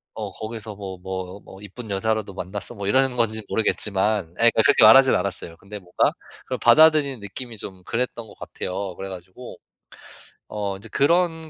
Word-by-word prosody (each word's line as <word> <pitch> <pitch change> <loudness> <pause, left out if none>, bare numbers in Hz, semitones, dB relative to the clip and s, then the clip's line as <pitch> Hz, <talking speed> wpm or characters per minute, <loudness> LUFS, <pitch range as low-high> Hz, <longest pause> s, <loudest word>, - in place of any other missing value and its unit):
어 105 -3 -5
거기서 110 0 -7
뭐 95 -2 -7
뭐 95 +1 -6
뭐 95 - -13
"이쁜 105 +3 -9
여자라도 105 0 -1
만났어?" 100 +5 -6
뭐 100 -2 -5
이러는 130 +2 +2
건지 110 -2 0
모르겠지만 105 -3 0
예, - - -26 0.2
그러니까 115 - +3
그렇게 - - +5
말하진 130 +5 +8
않았어요. 90 -3 -2
근데 105 +3 -10
뭔가 90 -2 +1 0.3
그걸 - - -4
받아들이는 155 -6 +5
느낌이 115 +3 -8
좀 95 -2 -10
그랬던 115 -1 -3
것 - - -16
같아요. 95 0 -5
그래 95 - -6
가지고 95 +7 -10 0.9
어 100 -2 -3
인제 105 +4 -12
그런 160 +4 +1
105 Hz, 385 characters per minute, -23 LUFS, 95-120 Hz, 0.9 s, 말하진